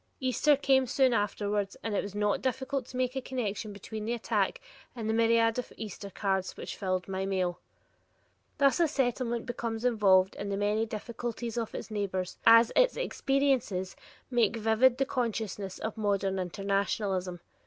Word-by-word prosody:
Easter 260 +3 +3
came 265 -2 +3
soon 260 0 +3
afterwards, 205 -1 -1
and 225 - -2
it - - +2
was 200 0 -7
not 210 -1 +1
difficult 265 0 -2
to 250 - -8
make 255 0 0
a 265 - -1
connection 225 -4 -3
between 210 +2 -7
the 235 +3 -1
attack 240 - 0 0.4
and 225 -3 -4
the 220 - +1
myriad 230 +1 +3
of 250 - -6
Easter 205 -1 -7
cards 190 -1 -2
which - - -6
filled 185 -2 -2
my 190 0 -2
mail. 185 -2 -1 1.0
Thus 280 +2 +3
a 340 - +4
Settlement 245 -4 -1
becomes 235 -1 -4
involved 195 -5 +4
in 200 - -4
the 200 - -1
many 210 +2 +1
difficulties 230 +1 -5
of 230 -2 -3
its - - -6
neighbors 190 -3 -3
as 230 0 +8
its - - +4
experiences 270 - 0 0.4
make 235 -2 +2
vivid 225 +3 +3
the 270 - +1
consciousness 220 -7 -3
of 220 - -4
modern 195 -2 0
internationalism. 195 -1 -1
220 Hz, 165 wpm, -30 LUFS, 200-250 Hz, 1.0 s, as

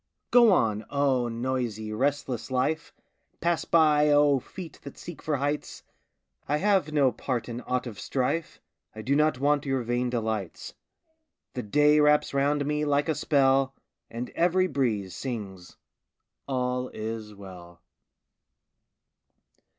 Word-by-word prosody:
Go 240 -3 +7
on, 110 - +2
oh, 135 -4 +1
noisy, 115 -3 -3
restless 130 0 -1
life! 145 +6 -1 0.5
Pass 170 -1 0
by, 150 -2 +4
oh, 145 -1 +4
feet 170 +4 -10
that 140 - -10
seek 175 -2 -9
for 155 - -1
heights! 145 +2 -3 0.6
I 150 - +1
have 190 -3 +2
no 140 -4 +3
part 125 -3 -3
in 120 0 -5
aught 125 0 -1
of 110 -5 -8
strife; 140 +8 -2 0.4
I 110 - -7
do 135 +6 +1
not 150 -2 +2
want 145 +1 +2
your 135 -2 0
vain 120 +1 -1
delights. 110 -6 -3 0.8
The 125 - -3
day 150 +7 +3
wraps 150 -1 +3
round 145 +1 +1
me 150 +1 -1
like 145 0 +1
a - - +3
spell, 135 -3 +2 0.3
And 120 +2 -6
every 180 +2 +2
breeze 110 - -1
sings, 100 -8 -6 0.7
"All 125 -1 -1
is 110 -1 -6
well." 90 -3 -12
135 Hz, 135 wpm, -27 LUFS, 115-150 Hz, 0.8 s, Go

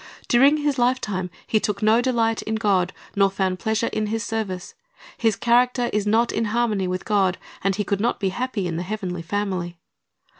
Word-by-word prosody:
During 275 +5 +5
his 290 -3 0
lifetime 215 -7 0 0.2
he 215 - +2
took 210 -1 -2
no 220 +2 +5
delight 230 -3 +1
in 220 - -3
God, 195 -4 +1 0.2
nor 195 -1 +4
found 190 -1 -1
pleasure 220 0 0
in 215 0 -1
His 225 +1 -2
service. 205 - -4 0.4
His 225 -3 +1
character 245 +2 +2
is 210 0 0
not 230 +3 +3
in 230 - 0
harmony 215 -3 0
with 185 0 -3
God, 195 -4 +2 0.3
and 195 0 +1
he 210 - -1
could 200 0 -1
not 235 - 0
be 195 - 0
happy 235 -1 -2
in 165 -2 -2
the - - -2
heavenly 180 -2 -4
family. 180 -1 -3
210 Hz, 190 wpm, -23 LUFS, 190-235 Hz, 0.4 s, During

